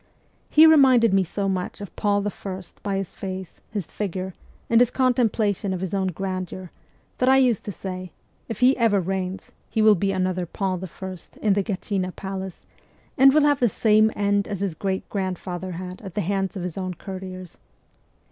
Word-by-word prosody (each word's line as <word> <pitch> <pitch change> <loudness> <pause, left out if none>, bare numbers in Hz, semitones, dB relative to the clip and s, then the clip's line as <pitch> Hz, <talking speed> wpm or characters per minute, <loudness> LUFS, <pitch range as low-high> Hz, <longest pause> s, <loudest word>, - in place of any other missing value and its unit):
He 310 +1 +7
re 320 0 +8
minded 250 -6 +5
me 195 -1 +4
so 195 +3 -3
much 185 -2 -2
of 200 -3 -9
Paul 205 -1 +1
I. 195 -2 -5 0.2
by 200 -1 -1
his 195 -2 -4
face, 190 -2 -7
his 205 -6 -3
figure, 190 -1 -4 0.3
and 230 +1 +5
his 245 - +5
contemplation 225 -6 +1
of - - -4
his 190 0 -4
own 190 -1 +1
grandeur, 185 0 -4 0.5
that 255 - +3
I 265 - +6
used 250 -6 +3
to 205 - -3
say, 185 -2 -6 0.2
' - - -39
If 225 - -5
he 255 +2 +6
ever 225 -5 +3
reigns, 190 +1 -3 0.2
he - - -2
will 215 0 +8
be 195 +1 0
another 185 -1 -1
Paul 185 +1 -2
I. 190 +1 -7 0.3
in 210 -2 +4
the 200 - +2
Gatchina 190 -2 -2
palace, 190 -1 -6 0.5
and 270 0 +7
will 300 +1 +4
have 290 -1 +3
the 240 - +3
same 215 +1 +4
end 205 0 +1
as 200 -3 -4
his 195 -4 -1
great 190 +3 -3
grandfather 185 -1 -4
had 180 +1 -7
at 195 -4 -9
the 210 - +1
hands 195 +2 -1
of 180 - -4
his 180 +1 -4
own 185 -1 -3
courtiers.' 185 -2 -8
195 Hz, 195 wpm, -24 LUFS, 185-215 Hz, 0.5 s, re